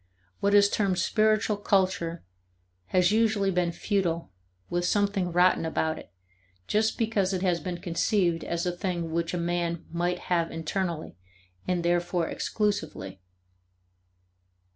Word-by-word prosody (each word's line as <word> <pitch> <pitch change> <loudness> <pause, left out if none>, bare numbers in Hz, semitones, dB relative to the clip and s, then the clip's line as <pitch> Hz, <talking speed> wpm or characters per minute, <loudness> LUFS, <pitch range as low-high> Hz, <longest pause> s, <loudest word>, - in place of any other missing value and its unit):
What 200 +1 +2
is 200 0 +7
termed 200 -3 0
spiritual 215 0 +2
culture 185 -4 0 0.6
has 180 0 +3
usually 215 -3 +2
been 175 -1 +1
futile, 170 - -1 0.4
with 175 0 -1
something 200 -1 +1
rotten 180 0 +4
about 160 -1 -1
it, - - -14 0.5
just 220 - +1
because 215 -5 +1
it 185 0 -1
has 180 -2 +2
been 180 -1 -4
conceived 170 0 0
as 170 +1 -2
a 180 - +1
thing 175 -2 -3
which 170 +1 -1
a - - -1
man 170 -1 -1
might 175 +1 0 0.2
have 170 -1 +1
internally 165 - -3 0.5
and 180 -2 0
therefore 175 -1 +1
exclusively. 155 - -2
180 Hz, 130 wpm, -27 LUFS, 170-200 Hz, 0.6 s, is